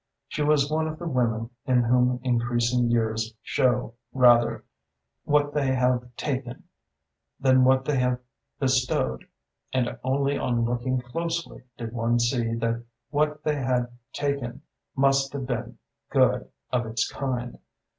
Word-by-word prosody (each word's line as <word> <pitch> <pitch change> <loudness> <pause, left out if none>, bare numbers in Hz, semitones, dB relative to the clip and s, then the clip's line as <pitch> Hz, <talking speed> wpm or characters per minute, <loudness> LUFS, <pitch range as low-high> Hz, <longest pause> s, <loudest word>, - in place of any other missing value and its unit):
She - - -4
was 145 -1 +3
one 160 +1 +1
of 155 0 -5
the 175 - -5
women 115 -4 0 0.2
in 125 -2 +4
whom 125 +1 +3
increasing 120 0 +1
years 110 -1 0
show 125 -3 +1 0.2
rather 120 -2 +5 0.6
what 145 0 +2
they 145 -2 +1
have 125 -1 0
taken 130 -3 -4 0.8
than 130 -1 +5
what 130 0 +4
they 145 -3 +1
have 125 0 +1 0.4
bestowed, 125 - 0 0.4
and 125 -2 -1
only 140 +2 +1
on 120 -1 +1
looking 120 +2 0
closely 165 +2 -4
did 115 -1 -6
one 120 0 +1
see 120 -1 +1
that 115 0 -1 0.3
what 150 0 0
they 150 -1 0
had 125 -2 0 0.2
taken 140 -4 -3 0.3
must 135 0 +3
have 140 -2 -3
been 120 -2 -4 0.3
good - - +2 0.2
of 120 -2 0
its 110 0 0
kind. 125 -3 -4
125 Hz, 135 wpm, -26 LUFS, 120-135 Hz, 0.8 s, rather